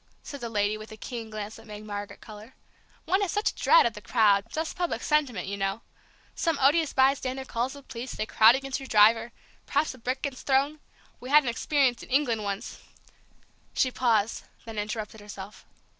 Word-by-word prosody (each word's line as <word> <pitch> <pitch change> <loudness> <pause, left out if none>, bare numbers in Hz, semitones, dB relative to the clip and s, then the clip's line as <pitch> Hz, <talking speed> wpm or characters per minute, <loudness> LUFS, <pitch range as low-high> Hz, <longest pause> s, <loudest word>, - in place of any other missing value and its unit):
said 285 -2 -8
the 235 - -4
lady, 210 0 0
with 215 +1 -10
a 220 - -9
keen 230 0 -6
glance 215 0 -6
that 225 0 -15
made 210 0 -9
Margaret 205 -1 -6
color. 215 +3 -12 0.5
"One 380 +2 +2
has 395 - 0
such 415 +1 +1
a - - -24
dread - - +5
of 235 - 0
the 210 - -10
crowd, 205 -3 +3
just 320 +1 -3
public 355 -1 -2
sentiment, 280 - +1
you 200 +1 -4
know. 195 +2 -2 0.5
Some 330 -4 0
odious 295 +3 +3
bystander 265 0 +1
calls 250 +1 -2
the 280 -1 -12
police, 245 0 -7
they 215 - -2
crowd 220 +2 +6
against 270 +1 -3
your 270 - -9
driver, 225 +2 +5 0.4
perhaps 295 +1 +1
a 255 - -15
brick 255 +3 -3
gets 275 -3 -4
thrown. 280 +3 +1 0.4
We 250 - -9
had 300 +1 +7
an 250 - -1
experience 255 0 +1
in - - -12
England 250 -5 +1
once 200 +2 -5 0.5
" - - -36
She 255 - +2
paused, 230 -4 +1 0.2
then 225 -2 -5
interrupted 215 0 -5
herself. 205 -1 -10
235 Hz, 200 wpm, -27 LUFS, 215-275 Hz, 0.5 s, had